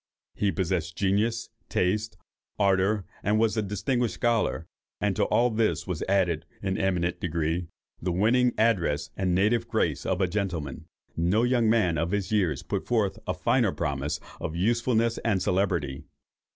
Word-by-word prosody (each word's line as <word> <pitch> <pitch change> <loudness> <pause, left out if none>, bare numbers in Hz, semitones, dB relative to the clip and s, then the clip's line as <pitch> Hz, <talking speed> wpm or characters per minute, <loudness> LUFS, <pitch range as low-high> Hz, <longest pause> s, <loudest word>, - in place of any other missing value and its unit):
He 100 -1 0
possessed 85 -4 -2
genius, 105 +4 +1 0.2
taste, 105 +5 0 0.4
ardour, 100 0 +2 0.2
was 110 +2 +2
a 110 - +1
distinguished 110 +4 -1
scholar, 115 -8 0 0.3
and - - 0
to - - +2
all 120 +1 +2
this 105 -7 0
was 90 -4 -4
added, 85 -4 +1 0.2
in 95 - -1
an 95 - -1
eminent 90 -2 0
degree, 85 0 -1 0.3
the 90 - -1
winning 120 +7 +3
address 85 -10 +1
and 90 -2 0
native 105 +5 +2
grace - - 0
of 95 -1 -1
a 95 - +3
gentleman. 90 -8 -3 0.3
No 90 +7 +2
young 120 -2 +3
man 100 -9 +2
of 85 +1 0
his 100 0 -2
years 90 -10 +1
put - - -3
forth 110 -5 +1
a - - -1
finer - - +2
promise 70 +1 -2 0.2
of 80 - -4
usefulness 115 +4 +1
and 105 -4 +1
celebrity. 90 -7 0
95 Hz, 155 wpm, -27 LUFS, 85-110 Hz, 0.4 s, winning